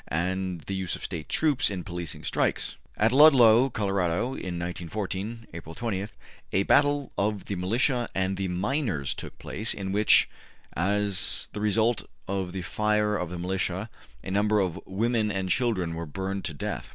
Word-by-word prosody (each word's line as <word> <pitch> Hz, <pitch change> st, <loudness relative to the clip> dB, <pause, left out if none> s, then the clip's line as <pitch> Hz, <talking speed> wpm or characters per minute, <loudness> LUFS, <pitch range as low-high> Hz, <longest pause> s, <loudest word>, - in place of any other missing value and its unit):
72), -, -, 0 dB
and 95 Hz, -1 st, -2 dB
the 95 Hz, -, -5 dB
use 95 Hz, -2 st, -2 dB
of -, -, -10 dB
State 80 Hz, -, -5 dB
troops 150 Hz, -5 st, +3 dB
in 95 Hz, -3 st, -4 dB
policing 85 Hz, -2 st, -5 dB
strikes -, -, 0 dB
(p. -, -, -14 dB, 0.2 s
298). 105 Hz, -, +3 dB
At 115 Hz, -, +4 dB
Ludlow 130 Hz, -4 st, +7 dB
(Colorado) 95 Hz, -6 st, 0 dB
in 90 Hz, -8 st, -4 dB
1914 95 Hz, +6 st, -4 dB
(April 80 Hz, 0 st, -8 dB
20) 105 Hz, -4 st, -2 dB, 0.5 s
a 95 Hz, -, +3 dB
battle 145 Hz, +3 st, +3 dB
of 105 Hz, 0 st, 0 dB
the 100 Hz, -, -3 dB
militia 120 Hz, +7 st, 0 dB
and 95 Hz, 0 st, 0 dB
the 95 Hz, 0 st, -2 dB
miners 95 Hz, -, -1 dB
took -, -, -8 dB
place, 110 Hz, +3 st, -3 dB
in 95 Hz, -1 st, -4 dB
which, 105 Hz, +2 st, +5 dB, 0.5 s
as 100 Hz, +2 st, +1 dB
the 105 Hz, -, -4 dB
result 110 Hz, +2 st, +1 dB, 0.2 s
of 95 Hz, -2 st, -2 dB
the 95 Hz, -1 st, -4 dB
fire 105 Hz, +2 st, +1 dB
of 90 Hz, -3 st, -2 dB
the 90 Hz, -, -5 dB
militia, 95 Hz, +3 st, -2 dB, 0.3 s
a -, -, -5 dB
number 105 Hz, +2 st, +3 dB
of 95 Hz, -2 st, -1 dB
women 110 Hz, +3 st, +1 dB
and 95 Hz, -2 st, -2 dB
children 110 Hz, -10 st, +1 dB
were 85 Hz, 0 st, -5 dB
burned 95 Hz, +5 st, -4 dB
to 80 Hz, -, -3 dB
death. -, -, -4 dB
100 Hz, 175 wpm, -27 LUFS, 90-110 Hz, 0.5 s, Ludlow